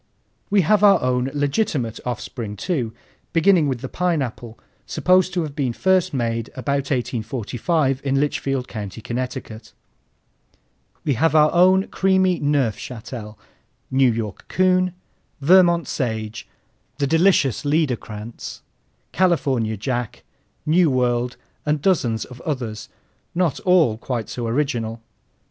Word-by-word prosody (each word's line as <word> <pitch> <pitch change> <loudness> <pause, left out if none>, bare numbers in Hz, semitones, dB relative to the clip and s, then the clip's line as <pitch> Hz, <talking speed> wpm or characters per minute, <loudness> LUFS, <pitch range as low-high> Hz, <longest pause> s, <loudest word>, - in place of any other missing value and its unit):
We 205 -1 +4
have 205 +5 +3
our 200 -1 +7
own 125 0 +1
legitimate 145 - -1
offspring 115 -2 -5
too, 120 - -2 0.4
beginning 170 -2 +4
with 130 -4 -2
the 130 - -4
Pineapple, 130 -9 -2 0.3
supposed 185 0 +3
to 175 - +1
have 150 -2 -6
been 130 -5 -1
first 190 +5 +2
made 115 -3 -2
about 140 +2 -2
1845 130 - -1
in 135 -1 +1
Litchfield 135 -3 -1
County, 105 -1 -6
Connecticut. 120 -2 -5 1.3
We 145 - +1
have 160 +6 +2
our 150 0 +6
own 185 +2 +5
creamy 190 -2 +2
Neufchâtel, 120 -5 -2 0.6
New 130 -1 +4
York 110 -4 -5
Coon, 185 -1 +2 0.4
Vermont 170 +2 +5
Sage, 110 -4 -3 0.5
the 140 - +1
delicious 160 - +3
Liederkranz, 125 -7 -2 0.5
California 135 - +1
Jack, 120 +2 -3 0.4
Nuworld, 125 -7 +2 0.3
and 150 0 0
dozens 135 -10 +1
of 125 -1 -12
others, 120 -8 -4 0.5
not 175 -5 +1
all 165 - +3
quite 120 -3 -4
so 120 -2 -4
original. 115 -3 -1
135 Hz, 115 wpm, -22 LUFS, 115-165 Hz, 1.3 s, our